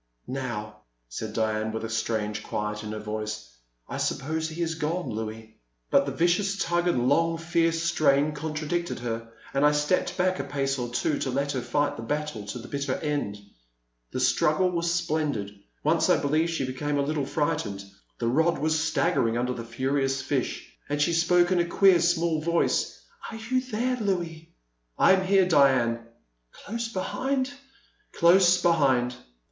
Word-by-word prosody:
Now/' 120 -5 -4 0.3
said 105 - -5
Diane, 110 -1 0
with 110 +1 -4
a - - -5
strange 110 -2 -1
quiet 105 0 -3
in 105 - -5
her 110 - -4
voice, 110 0 -5 0.4
I - - -5
suppose 160 +3 -1
he 165 +2 -3
is 165 -1 -1
gone, 165 +1 -2
I<ouis.*' 110 0 -5 0.4
But - - +4
the - - -1
vicious 195 +4 +1
tug 175 -2 0
and 125 -8 +2
long, 165 +4 +2
fierce 165 0 +1
strain 155 -3 +3
con 155 +1 -5
tradicted 170 +3 -2
her, 115 -1 -4 0.2
and 140 +1 +1
I 150 0 +5
stepped 160 +4 0
back 185 -1 +1
a - - -1
pace 135 -1 -1
or 120 - -2
twG 140 +5 -1
to 135 - -1
let 140 +2 -1
her 130 - -2
fight 145 +4 0
the - - -6
battle 145 -4 -3
to 100 - -5
the 120 0 -9
bitter 140 -2 -2
end. 145 -9 -2 0.7
The - - -4
struggle 180 +4 +2
was 170 -1 0
splendid. 150 -12 -1 0.2
Once 160 +4 +2
I 180 - +5
believe 155 +4 +1
she 165 -5 -1
became 145 +3 -2
a 140 - +2
little 145 -1 -1
frightened, 145 -11 -2 0.2
— - - -41
^the 115 +1 0
rod 160 +2 +3
was 155 +1 +1
stag 165 +2 +1
gering 115 -6 +1
under 125 +1 0
the 115 - -6
furious 135 +3 -1
fish, 130 -1 -2
— - - -29
^and 145 - -1
she 170 +3 +2
spoke 175 +2 +3
in 180 - +3
a 170 - +2
queer, 185 +1 +5
small 170 -2 +1
voice: 170 +1 0 0.3
Are 225 - -7
you 245 +4 -1
there, 250 +1 -1
Louis? 175 -7 -3 0.5
I - - +6
am 190 0 +2
here, 190 -1 +4
Diane. 130 -7 +3 0.5
''Close 230 +2 -5
behind? 260 +7 -1 0.6
''Close 180 +1 +5
behind. 135 -8 +3
150 Hz, 180 wpm, -26 LUFS, 120-170 Hz, 0.7 s, I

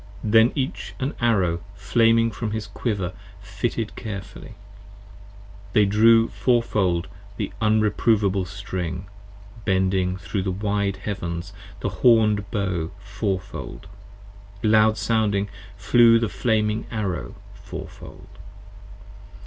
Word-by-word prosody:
p. 110 - -2
98 - - -1
THEN 110 +2 +6
each 130 -1 -3
an 135 +3 -2
Arrow 95 -8 +2
flaming 115 +4 +3
from 110 -1 -4
his 110 0 -3
Quiver 100 -3 -3 0.3
fitted 105 +2 -3
carefully: 105 0 -8 1.2
They 105 - +5
drew 115 +3 +5
fourfold 105 -8 +1 0.3
the - - -3
unreprovable 105 -2 +2
String, 95 -3 -5 0.6
bending 95 -1 +1
thro' 90 +2 -3
the 95 - -2
wide 100 0 -1
Heavens 90 -2 -5 0.3
The - - -1
horned 105 -4 +4
Bow 95 -7 -2
Fourfold, 100 -2 -4 0.8
loud 110 0 +4
sounding 105 -2 +1 0.3
flew 115 +3 +5
the 115 -2 0
flaming 110 -1 0
Arrow 95 - -3 0.2
fourfold. - - -11
105 Hz, 105 wpm, -23 LUFS, 95-110 Hz, 1.2 s, THEN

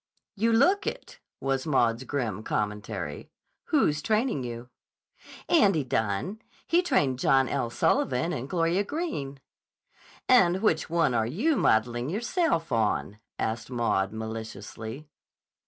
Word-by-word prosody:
"You 225 +3 +1
look 360 - +3
it," - - -6 0.2
was 135 +1 -1
Maud's 120 -3 +2
grim 115 -9 -2
commentary. 105 -8 -4 0.4
"Who's 150 0 +2
training 220 - 0
you?" 120 0 -7 0.8
"Andy 200 - +4
Dunne. 115 - -2 0.2
He 345 +1 +3
trained 145 - +1
John 135 0 +3
L. 130 -4 -1
Sullivan 130 +6 +1
and 130 +3 -5
Gloria 175 +2 +1
Greene." 200 - -4 0.9
"And 190 -6 +4
which 160 -8 +1
one 165 -6 +2
are 110 -2 +1
you 240 - +1
modeling 120 - +1
yourself 225 - 0
on?" 110 -2 0 0.2
asked 115 +1 -3
Maud 115 -6 0
maliciously. 110 +4 -7
135 Hz, 120 wpm, -27 LUFS, -, 0.9 s, Andy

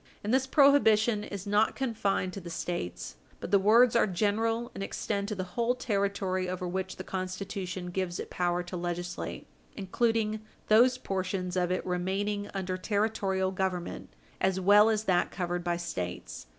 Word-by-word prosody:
And 210 +3 -1
this 265 0 +2
prohibition 235 -7 +4
is 200 -1 -6
not 205 +2 +2
confined 205 -7 -1
to 195 - -6
the 170 - -8
States, 125 - -4 0.2
but - - -6
the 200 - +6
words 225 +5 +5
are 230 - +4
general, 225 +5 0
and 195 - -5
extend 200 0 -2
to 210 - -3
the 185 - -3
whole 235 +1 +1
territory 200 -5 -1
over 185 0 -3
which 190 +1 -3
the 185 - -7
Constitution 185 -1 -4
gives 180 -1 -2
it - - -6
power 175 0 0
to 175 +1 -7
legislate, 175 0 -4 0.3
including 215 +2 0 0.3
those 245 +4 +6
portions 185 -4 -3
of 180 -1 +1
it 185 - -1
remaining 195 +3 -1
under 185 -1 -3
Territorial 195 -2 0
Government, 185 -2 -3 0.3
as 190 0 +1
well 205 +3 +6
as 215 -1 +1
that 180 -4 +2
covered 175 -1 -3
by 175 0 0
States. 90 - -5
195 Hz, 165 wpm, -29 LUFS, 180-215 Hz, 0.3 s, the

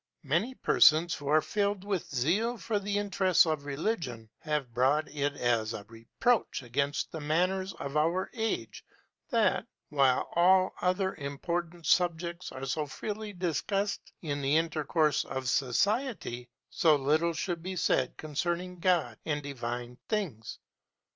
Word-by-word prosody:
Many 175 - 0
persons, 160 -4 +5
who 145 - -6
are 155 +2 +4
filled 205 -2 -1
with 200 -4 -2
zeal 185 - +1
for 225 -2 -1
the 200 +1 -2
interests 190 -3 +3
of 155 -3 -2
religion, 140 - -3
have 150 -6 -2
brought 135 +6 +2
it 145 -1 -1
as 115 -3 0
a 105 - -7
reproach 115 - -1
against 140 +4 -1
the 160 - -5
manners 185 +5 0
of 140 +1 -6
our 165 +5 +2
age 215 - -3 0.5
that, - - +2 0.2
while 135 -3 +3
all 185 +2 +5
other 190 +1 +1
important 170 +4 -4
subjects 175 0 +1
are 130 +1 -6
so 150 +3 -1
freely 210 +7 -5
discussed 195 +3 -2
in 145 -3 -2
the 140 +3 +3
intercourse 155 -2 +1
of 130 -1 -4
society, 135 - 0 0.2
so 160 -3 +4
little 155 +4 +2
should 170 +1 -3
be 185 +2 -5
said 150 -7 +1
concerning 175 +4 -3
God 165 - +1
and 150 -2 -2
divine 120 -2 -5
things. 170 - -3
160 Hz, 140 wpm, -30 LUFS, 140-185 Hz, 0.5 s, persons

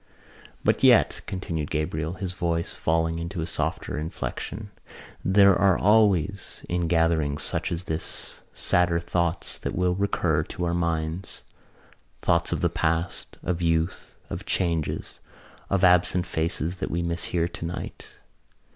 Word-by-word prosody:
"But - - +2
yet," - - +5
continued 85 -5 -3
Gabriel, 80 +1 -2
his 95 -1 -4
voice 85 -2 -1
falling 80 0 0
into 85 +2 -4
a 80 - -1
softer 80 -1 -2
inflection, 100 +6 -5 0.5
"there 100 0 +6
are 95 -1 +4
always 100 -3 +2
in 85 -1 0
gatherings 80 -3 +2
such - - -1
as 85 +1 -2
this 80 -2 -5
sadder 90 -1 +2
thoughts 85 +1 -1
that - - -4
will 90 0 +2
recur 90 -5 +1
to 85 +3 -4
our 85 - 0
minds: 85 +1 -2 0.8
thoughts 85 0 +1
of - - -1
the 85 - +4
past, 85 0 -2
of 90 -1 -1
youth, 85 +1 0
of - - -6
changes, 85 -4 -1 0.5
of 100 -1 +1
absent 90 0 +4
faces 85 +1 -2
that 90 - -3
we 85 +1 -1
miss 85 0 -1
here 85 -1 0
tonight. 85 0 -7
85 Hz, 140 wpm, -26 LUFS, 80-90 Hz, 0.8 s, there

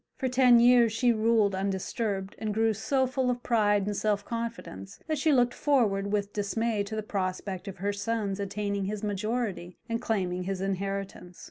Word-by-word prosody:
For 265 - -1
ten 250 -1 +5
years 240 -1 +6
she 235 +2 +2
ruled 220 -2 +2
undisturbed, 195 +1 -2
and 215 -2 -3
grew 225 0 +2
so 260 +5 +1
full 255 0 -1
of 245 0 -2
pride 205 -4 +2
and 205 0 -2
self 205 -1 0
confidence 230 - -6
that 310 -2 -2
she 310 +2 +3
looked 245 -3 +3
forward 205 -9 +1
with 205 -1 -1
dismay 210 +1 -1
to 220 +2 -6
the 215 - -3
prospect 190 -1 -3
of 195 - -7
her 200 +3 -1
son's 205 -1 -2
attaining 200 0 -2
his 210 +1 -4
majority 205 -3 -3
and 230 -1 -2
claiming 185 -4 -1
his 195 0 -3
inheritance. 195 -1 -4
210 Hz, 175 wpm, -28 LUFS, 195-230 Hz, -, years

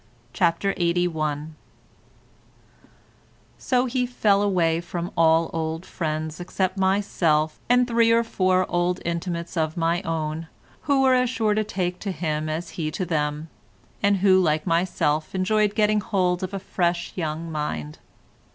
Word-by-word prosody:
CHAPTER 180 +2 +1
LXXXI 160 -4 0 2.1
So 250 -1 +1
he 250 0 -1
fell 210 -5 +2
away 170 -5 +1
from 175 0 -5
all 165 0 +3
old 165 +1 -3
friends 155 -1 -4
except 185 +1 -2
myself 185 -5 +1
and 245 0 +4
three 230 -1 +3
or 230 0 +4
four 185 -4 +1
old 175 +1 0
intimates 170 0 -3
of 160 0 -1
my 170 +1 +1
own, 160 -2 -3 0.4
who 275 -2 +3
were 260 -1 +5
as 250 -1 +3
sure 225 -4 +1
to 215 +1 +1
take 180 -3 -3
to 200 - -3
him 155 -3 -2
as 160 +3 -4
he 155 - -1
to 180 +4 -3
them, 150 -1 -2 0.5
and 200 0 +3
who 190 0 +5
like 155 -3 +1
myself 165 -2 0
enjoyed 205 +2 +1
getting 215 -1 +2
hold 180 -3 0
of 185 0 -3
a - - -1
young - - -8
fresh 175 -1 -1
mind. 155 - -4
175 Hz, 145 wpm, -24 LUFS, 160-200 Hz, 2.1 s, were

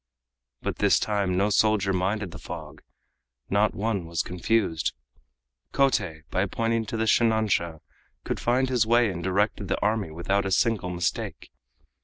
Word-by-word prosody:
But - - -2
this - - +4
time 100 -4 0
no 100 +2 +2
soldier 100 -2 +3
minded 95 +1 -1
the - - -9
fog, - - -8 0.7
not 105 +1 +2
one 100 -4 -2
was 85 -1 -1
confused. 90 -2 0 0.8
Kotei 95 - +1
by - - +1
pointing 115 -1 -1
to 115 - -3
the 110 - 0
shinansha 110 -9 +2 0.4
could - - -3
find 125 +2 +2
his 120 -4 +2
way 120 -2 +4
and 85 -1 -6
directed 100 +2 0
the 95 - -1
army 105 -4 0
without 90 +5 0
a 95 - -2
single 105 -1 +1
mistake. 90 -1 -3
100 Hz, 150 wpm, -26 LUFS, 90-110 Hz, 0.8 s, this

